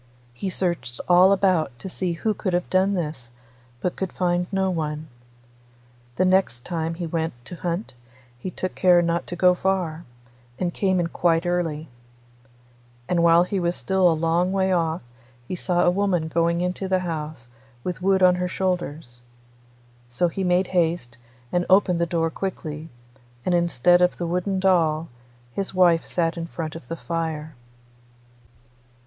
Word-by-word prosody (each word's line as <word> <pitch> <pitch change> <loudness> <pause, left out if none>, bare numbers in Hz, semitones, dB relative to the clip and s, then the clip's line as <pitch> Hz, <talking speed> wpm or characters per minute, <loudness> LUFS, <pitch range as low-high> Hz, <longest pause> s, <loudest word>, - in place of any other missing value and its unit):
He 155 +11 -4
searched 170 -10 -2
all 180 +2 +6
about 180 -9 +2
to 190 - -8
see 180 -1 -2
who 215 +6 -1
could 190 -2 -3
have 175 0 0
done 190 +2 +3
this, 150 -8 -4 0.5
but 180 - -1
could 190 -2 -3
find 175 -1 0
no 190 -1 +1
one. 155 -2 -3 1.1
The 185 - +2
next 185 -11 +2
time 165 -1 -2
he 170 0 -4
went 165 0 -2
to 180 - -7
hunt 175 +2 -3 0.5
he 185 - -4
took 185 +1 -4
care 180 -2 +4
not 170 0 -1
to 175 - -4
go 180 +1 +5
far, 180 -3 -1 0.5
and 175 -2 -2
came 190 -2 +1
in 175 - +1
quite 165 0 +1
early. 165 -3 -1 1.2
And 175 -1 +1
while 170 0 +6
he 190 +2 -2
was 175 0 0
still 190 -2 +2
a - - +3
long 170 +3 +1
way 190 -1 +1
off 165 -3 0 0.4
he 185 - -3
saw 175 0 0
a 175 - +4
woman 180 -4 0
going 170 +1 +1
into 180 +2 -2
the 185 -1 +1
house 155 -6 -5 0.4
with 180 0 -4
wood 190 0 +3
on 180 0 +7
her 180 0 -1
shoulders. 165 -10 -3 0.9
So 125 +9 +1
he 190 +4 -3
made 180 +1 +2
haste, 165 -9 0 0.3
and 175 0 +1
opened 185 -3 +4
the 170 - +1
door 165 -1 0
quickly, 160 -4 -5 0.6
and 180 - +1
instead 175 0 +3
of 180 0 +3
the 175 - -3
wooden 180 +3 -1
doll, 165 -4 +2 0.4
his 195 -1 -3
wife 175 -3 +4
sat 165 -1 0
in 165 - -4
front 160 -2 -5
of 165 - -10
the 165 - -4
fire. 160 -2 -4
175 Hz, 165 wpm, -24 LUFS, 165-185 Hz, 1.2 s, on